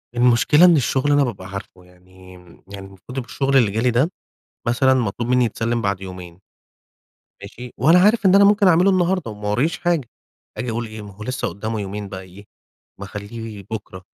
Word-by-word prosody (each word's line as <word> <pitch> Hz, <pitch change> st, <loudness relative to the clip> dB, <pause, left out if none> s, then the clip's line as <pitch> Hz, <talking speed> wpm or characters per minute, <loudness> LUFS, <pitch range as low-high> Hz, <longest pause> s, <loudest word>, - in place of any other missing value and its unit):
المشكلة 125 Hz, +7 st, +4 dB
إن 175 Hz, -, +6 dB
الشغل 135 Hz, +1 st, +1 dB
أنا 145 Hz, 0 st, +4 dB
بابقى 100 Hz, -7 st, -5 dB
عارفه 95 Hz, -2 st, -9 dB
يعني، 90 Hz, +1 st, -18 dB, 0.4 s
يعني 100 Hz, -1 st, -8 dB
المفروض 95 Hz, +7 st, -12 dB
إن 130 Hz, -, -2 dB
الشغل 135 Hz, +2 st, 0 dB
اللي 115 Hz, -6 st, +3 dB
جه 110 Hz, -, -2 dB
لي 125 Hz, +2 st, +2 dB
ده 130 Hz, +9 st, +1 dB, 0.6 s
مثلًا 130 Hz, +3 st, +3 dB
مطلوب 120 Hz, -1 st, -2 dB
مني 125 Hz, 0 st, +3 dB
يتسلّم 115 Hz, +1 st, -2 dB
بَعد 100 Hz, -2 st, -1 dB
يومين. 90 Hz, -2 st, -10 dB, 1.0 s
ماشي، 125 Hz, 0 st, -10 dB
وأنا 165 Hz, +7 st, +5 dB
عارف 210 Hz, +2 st, +3 dB
إن 190 Hz, 0 st, +6 dB
أنا 200 Hz, -, +7 dB
ممكن 205 Hz, 0 st, +4 dB
أعمله 180 Hz, +2 st, +4 dB
النهاردة، 185 Hz, -, 0 dB
وما 105 Hz, 0 st, -6 dB
وراييش 135 Hz, +11 st, 0 dB
حاجة، 170 Hz, -7 st, 0 dB, 0.5 s
أجي 125 Hz, -, -3 dB
أقول 115 Hz, +1 st, -3 dB
إيه، 110 Hz, 0 st, -9 dB
ما 105 Hz, -1 st, -10 dB
هو 105 Hz, +3 st, -10 dB
لسه 125 Hz, +2 st, -3 dB
قُدّامه 110 Hz, +4 st, -4 dB
يومين 100 Hz, 0 st, -6 dB
بقي 95 Hz, -1 st, -7 dB
إيه، 95 Hz, +3 st, -15 dB, 0.5 s
ما 100 Hz, -, -6 dB
أخلّيه 105 Hz, +1 st, -8 dB
بُكرة 95 Hz, -4 st, -7 dB
115 Hz, 190 wpm, -20 LUFS, 100-135 Hz, 1.0 s, أنا